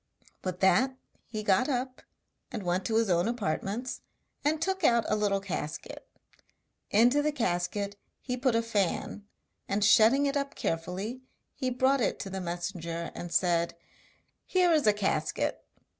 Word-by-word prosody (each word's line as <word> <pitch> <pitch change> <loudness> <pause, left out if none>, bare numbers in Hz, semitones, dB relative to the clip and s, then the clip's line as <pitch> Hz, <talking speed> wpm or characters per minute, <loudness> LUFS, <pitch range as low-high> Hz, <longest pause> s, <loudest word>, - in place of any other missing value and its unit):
With 185 -1 -4
that 260 +7 +3 0.3
he 215 -2 -5
got 205 +6 +3
up 255 -1 -2 0.5
and 205 - -4
went 180 +1 0
to 225 - 0
his 225 0 +3
own 175 +3 +2
apartments 230 +2 -2 0.4
and 300 +2 +1
took 380 +2 -1
out 235 -1 +4
a - - +2
little 205 -2 +1
casket. 175 -5 -5 0.8
Into 245 +7 +4
the 300 +1 +1
casket 200 -3 -2 0.2
he 250 - -3
put 250 -1 +1
a 230 - +2
fan, 205 -1 -1 0.4
and 200 +1 +2
shutting 230 +7 +6
it 280 0 0
up 280 0 -2
carefully 185 +9 -3 0.3
he 260 -2 -2
brought 260 +2 +2
it 215 - +1
to 195 - -6
the 190 0 -4
messenger 170 -1 -4
and 175 - -7
said: 170 -2 +2 0.7
'Here 365 -2 +3
is 305 -7 +3
a 210 - +6
casket. 205 -1 -1
210 Hz, 155 wpm, -29 LUFS, 185-255 Hz, 0.8 s, shutting